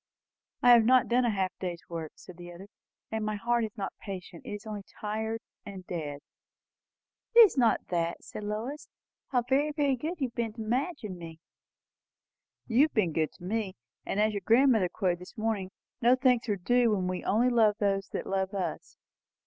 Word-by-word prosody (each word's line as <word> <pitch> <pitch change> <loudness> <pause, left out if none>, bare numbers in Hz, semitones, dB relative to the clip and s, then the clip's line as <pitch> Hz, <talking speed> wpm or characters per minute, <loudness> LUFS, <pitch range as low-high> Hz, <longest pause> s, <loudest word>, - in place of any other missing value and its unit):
"I 245 - +8
have 235 -2 +8
not 255 +2 +5
done 245 +1 +3
a - - +3
half 195 -3 0
day's 175 -2 -4
work," 165 -2 -6
said 180 -2 -13
the 175 0 -9
other; 190 +4 -11 0.4
"and 220 -1 -2
my 215 0 -1
heart 235 +3 +1
is 220 0 -5
not 195 - -4
patient. 185 -4 -8
It - - -5
is 205 +2 -7
only 210 -2 -5 0.2
tired, 220 +1 -3 0.2
and 195 -3 -9
dead." 150 -5 -5 1.1
"It 475 - +11
is 435 - +7
not 240 -4 +2
that," 170 -1 -1
said 215 - -8
Lois. 220 +8 -4 0.4
"How 250 -3 +1
very, 275 +5 +1
very 290 -3 +1
good 320 +7 -4
you 265 -3 0
have - - -30
been 230 -2 -2
to 225 - -8
Madge 260 +9 -1
and 185 -4 -6
me!" 165 -1 -9 1.3
"You 240 +2 +3
have 310 - -8
been 185 -8 +2
good 155 0 0
to - - -17
me. 200 0 -2 0.3
And, 200 - -2
as 215 0 +3
your 200 - -3
grandmother 230 -5 +4
quoted 180 -3 -1
this 180 - -13
morning, 215 -4 -1 0.3
no 245 +2 +6
thanks 250 -3 +2
are 205 - +2
due 240 +6 +2
when 185 -2 -1
we 185 0 -3
only 235 +5 +3
love 225 -4 +4
those 195 -1 0
who - - -3
love 190 +1 -2
us. 190 -2 -4
215 Hz, 200 wpm, -29 LUFS, 185-240 Hz, 1.3 s, It